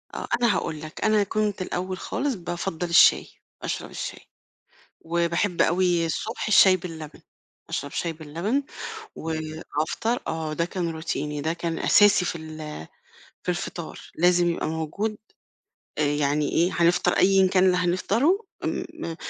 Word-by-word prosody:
آه -, -, -4 dB
أنا 235 Hz, -3 st, +4 dB
هاقول 155 Hz, -1 st, -3 dB
لك، 155 Hz, 0 st, -7 dB
أنا 215 Hz, -1 st, +4 dB
كنت 210 Hz, -1 st, -1 dB
الأول 185 Hz, 0 st, -3 dB
خالص 275 Hz, +7 st, -2 dB
بافضّل 175 Hz, -1 st, -4 dB
الشاي، 170 Hz, -, +6 dB, 0.3 s
أشرب -, -, -4 dB
الشاي، -, -, -5 dB, 0.8 s
وباحب 170 Hz, +2 st, +1 dB
أوي 175 Hz, -1 st, +2 dB
الصبح 220 Hz, +9 st, -3 dB
الشاي 195 Hz, -3 st, +7 dB
باللبن، 165 Hz, -4 st, -8 dB, 0.5 s
أشرب 145 Hz, +2 st, -3 dB
شاي 170 Hz, +3 st, -2 dB
باللبن 170 Hz, -, -2 dB, 0.5 s
وافطر 160 Hz, +7 st, -2 dB
آه 160 Hz, -1 st, -3 dB
ده 170 Hz, +2 st, 0 dB
كان 175 Hz, -1 st, -3 dB
روتيني 150 Hz, -2 st, -3 dB
ده 160 Hz, +3 st, 0 dB
كان 170 Hz, -1 st, -3 dB
أساسي 205 Hz, -3 st, +5 dB
في 170 Hz, -, -2 dB
ال 155 Hz, -, -8 dB, 0.6 s
في -, -, -14 dB
الفطار، 175 Hz, -2 st, -4 dB
لازم 175 Hz, +1 st, +3 dB
يبقى 170 Hz, -, -2 dB
موجود 160 Hz, +7 st, -2 dB, 0.8 s
آآ 150 Hz, -, +2 dB
يعني 145 Hz, 0 st, +1 dB
إيه 175 Hz, +3 st, +2 dB
هنفطر 170 Hz, 0 st, +3 dB
أيًا 190 Hz, 0 st, +5 dB
كان 185 Hz, 0 st, +4 dB
اللي 180 Hz, -1 st, +4 dB
هنفطره، 225 Hz, -, +1 dB, 0.2 s
م 165 Hz, -, -4 dB
170 Hz, 135 wpm, -25 LUFS, 160-190 Hz, 0.8 s, الشاي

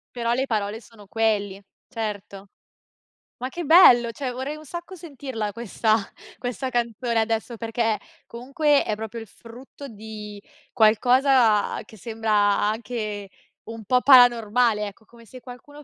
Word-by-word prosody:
Però 235 Hz, -1 st, -1 dB
le 260 Hz, +2 st, 0 dB
parole 215 Hz, -1 st, -2 dB
sono 210 Hz, -1 st, -17 dB
quelli, 205 Hz, -3 st, -1 dB, 0.3 s
certo. 205 Hz, -4 st, -6 dB, 0.9 s
Ma 255 Hz, -, -4 dB
che 340 Hz, +6 st, -6 dB
bello, 250 Hz, -8 st, +6 dB
cioè 255 Hz, +1 st, -5 dB
vorrei 265 Hz, +5 st, -5 dB
un 310 Hz, -, -13 dB
sacco 345 Hz, +5 st, -8 dB
sentirla 265 Hz, -, -6 dB
questa 220 Hz, -1 st, 0 dB, 0.4 s
questa 250 Hz, +1 st, -4 dB
canzone 235 Hz, -1 st, -2 dB
adesso 225 Hz, +1 st, -2 dB
perché 225 Hz, -1 st, -1 dB, 0.3 s
comunque 275 Hz, +5 st, 0 dB
è 215 Hz, -, -2 dB
proprio 220 Hz, +1 st, -7 dB
il 225 Hz, -, -11 dB
frutto 250 Hz, +6 st, -13 dB
di 210 Hz, -2 st, -10 dB, 0.3 s
qualcosa 240 Hz, 0 st, +3 dB
che 220 Hz, -, -16 dB
sembra 220 Hz, +1 st, -3 dB
anche 210 Hz, 0 st, -1 dB, 0.4 s
un 225 Hz, -2 st, -9 dB
po' 250 Hz, +3 st, +2 dB
paranormale, 240 Hz, -4 st, +4 dB
ecco 205 Hz, +2 st, -13 dB
come 230 Hz, +1 st, -18 dB
se 255 Hz, +4 st, -13 dB
qualcuno 255 Hz, +4 st, -13 dB
230 Hz, 135 wpm, -23 LUFS, 215-255 Hz, 0.9 s, bello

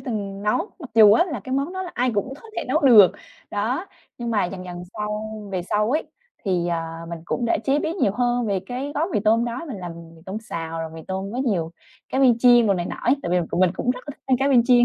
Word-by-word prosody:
từng 200 Hz, -5 st, -4 dB
nấu. 210 Hz, -, +2 dB, 0.2 s
Mặc 280 Hz, -7 st, -9 dB
dù 215 Hz, -2 st, +8 dB
á 235 Hz, -, +5 dB
là 295 Hz, -, -5 dB
cái 260 Hz, +6 st, -7 dB
món 280 Hz, +6 st, -1 dB
đó 375 Hz, 0 st, -3 dB
là 360 Hz, -, -6 dB
ai 250 Hz, +1 st, +1 dB
cũng 260 Hz, +6 st, -1 dB
có 455 Hz, -, -13 dB
thể -, -, -2 dB
nấu 305 Hz, +5 st, +2 dB
được. 225 Hz, -9 st, +8 dB, 0.4 s
Đó, 245 Hz, -, -1 dB, 0.3 s
nhưng 235 Hz, -1 st, -3 dB
mà 210 Hz, -4 st, +2 dB
dần 185 Hz, 0 st, -5 dB
dần 175 Hz, -1 st, -7 dB
sau 210 Hz, +1 st, -4 dB, 0.2 s
về 180 Hz, -2 st, -1 dB
sau 210 Hz, +5 st, 0 dB
ấy 310 Hz, +3 st, +1 dB, 0.4 s
thì, 180 Hz, -3 st, 0 dB
ờ, 170 Hz, -1 st, 0 dB, 0.3 s
mình 170 Hz, -1 st, -5 dB
cũng 240 Hz, -, -2 dB
đã 230 Hz, -, +2 dB
chế 280 Hz, +2 st, +2 dB
biến 325 Hz, +4 st, -2 dB
nhiều 200 Hz, -, +2 dB
hơn 245 Hz, 0 st, 0 dB
về 195 Hz, -2 st, 0 dB
cái 265 Hz, +5 st, -4 dB
gói 320 Hz, +5 st, 0 dB
mì 210 Hz, -, +1 dB
tôm 225 Hz, +2 st, +3 dB
đó. 240 Hz, +1 st, -3 dB
Mình 245 Hz, -, -5 dB
làm 175 Hz, -2 st, -6 dB, 0.2 s
mì 160 Hz, -, -17 dB
tôm 190 Hz, +2 st, -5 dB
xào 165 Hz, -5 st, -5 dB
rồi 160 Hz, -1 st, -4 dB
mì 165 Hz, -, -8 dB
tôm 190 Hz, +2 st, -3 dB
có 245 Hz, -, -4 dB
nhiều 190 Hz, -11 st, 0 dB, 0.4 s
cá 265 Hz, -, -2 dB
viên 250 Hz, -4 st, +5 dB
chiên, 240 Hz, -1 st, +6 dB
đồ 200 Hz, -, +3 dB
này 175 Hz, -1 st, -2 dB
nọ -, -, -5 dB
ấy, 255 Hz, +4 st, +4 dB
tại 175 Hz, -, -3 dB
vì 180 Hz, 0 st, +3 dB, 0.2 s
mình 185 Hz, -2 st, +4 dB
cũng 245 Hz, -, 0 dB
rất 250 Hz, -, -3 dB
là -, -, -3 dB
thích -, -, -38 dB
ăn 260 Hz, -1 st, +3 dB
cá 270 Hz, +1 st, +2 dB
viên 245 Hz, -4 st, +5 dB
chiên. 245 Hz, -1 st, +6 dB
225 Hz, 275 wpm, -23 LUFS, 190-255 Hz, 0.4 s, dù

